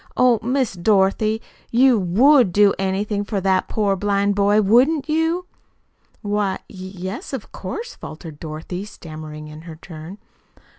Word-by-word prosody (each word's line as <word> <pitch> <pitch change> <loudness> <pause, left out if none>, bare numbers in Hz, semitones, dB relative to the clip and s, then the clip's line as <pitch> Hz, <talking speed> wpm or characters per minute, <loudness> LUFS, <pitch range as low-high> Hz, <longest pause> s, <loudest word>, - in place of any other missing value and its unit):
"Oh, 250 -3 +4
Miss 255 0 0
Dorothy, 205 +3 +2 0.3
you 250 -1 +4
WOULD 230 - +4
do 205 +1 +5
anything 200 +2 -1
for 205 -1 -2
that 190 0 +1
poor 205 -3 +1
blind 200 +1 +1
boy, 205 +1 +3
wouldn't 255 +10 +3
you?" 325 +3 0 0.8
"Why, 205 -2 0
y - - -14
yes, 185 +5 -7
of 260 -6 -6
course," 460 - -6
faltered 155 -1 -10
Dorothy, 160 +4 -6
stammering 155 -6 -9
in 150 +1 -10
her 165 -1 -10
turn. 165 +2 -10
200 Hz, 140 wpm, -21 LUFS, 180-230 Hz, 0.8 s, do